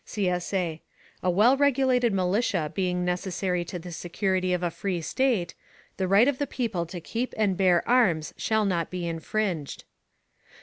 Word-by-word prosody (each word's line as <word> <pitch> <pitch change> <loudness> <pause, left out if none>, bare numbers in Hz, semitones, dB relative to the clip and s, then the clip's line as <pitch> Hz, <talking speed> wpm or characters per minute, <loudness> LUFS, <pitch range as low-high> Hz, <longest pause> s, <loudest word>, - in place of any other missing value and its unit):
[CSA] 180 -4 -2 0.4
A 185 - +1
well 215 +9 +5
regulated 260 -4 +3
militia 185 -4 0
being 180 0 -1
necessary 180 0 -1
to 180 - -6
the 175 +1 -8
security 185 +2 -1
of 180 0 0
a 175 - 0
free 185 0 -3
state, 205 -1 0 0.4
the 190 - 0
right 200 +6 +5
of 285 -2 0
the 285 - -1
people 200 -9 -2
to 175 +1 -6
keep 230 +9 -4
and 205 -3 +2
bear 180 -2 +3
arms 185 - +2
shall 220 -1 0
not 175 -4 0
be 180 -2 -4
infringed. 170 -2 -3
185 Hz, 160 wpm, -26 LUFS, 175-220 Hz, 0.4 s, well